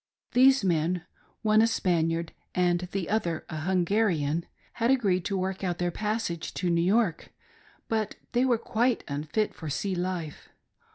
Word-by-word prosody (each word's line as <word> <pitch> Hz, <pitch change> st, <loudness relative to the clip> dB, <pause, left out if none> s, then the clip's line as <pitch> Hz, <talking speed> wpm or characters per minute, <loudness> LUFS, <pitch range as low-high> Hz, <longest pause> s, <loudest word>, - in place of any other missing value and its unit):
These 265 Hz, -1 st, +5 dB
men 175 Hz, 0 st, +1 dB, 0.2 s
— -, -, -37 dB
one 215 Hz, 0 st, +5 dB
a 225 Hz, -, +5 dB
Spaniard, 165 Hz, -6 st, 0 dB, 0.2 s
and 180 Hz, 0 st, +1 dB
th$ 195 Hz, -3 st, -2 dB
other 175 Hz, -7 st, -1 dB
a 160 Hz, -, -4 dB
Hungarian 175 Hz, -2 st, +1 dB
— -, -, -33 dB
had 230 Hz, -, +3 dB
agreed 200 Hz, -9 st, +2 dB
to 195 Hz, -, -1 dB
work 190 Hz, +1 st, -2 dB
out 175 Hz, -2 st, -1 dB
their 175 Hz, 0 st, 0 dB
passage 210 Hz, -5 st, -3 dB
tp 180 Hz, -2 st, 0 dB
New 170 Hz, 0 st, +2 dB
York, 190 Hz, -1 st, +1 dB, 0.6 s
but 220 Hz, -2 st, -1 dB, 0.2 s
they 245 Hz, +1 st, +2 dB
were 250 Hz, -3 st, +3 dB
quite 235 Hz, +1 st, 0 dB
unfit 155 Hz, +9 st, -1 dB
for 160 Hz, -, -7 dB
sea 195 Hz, +7 st, -2 dB
life. 175 Hz, -3 st, -4 dB
185 Hz, 165 wpm, -28 LUFS, 170-220 Hz, 0.6 s, These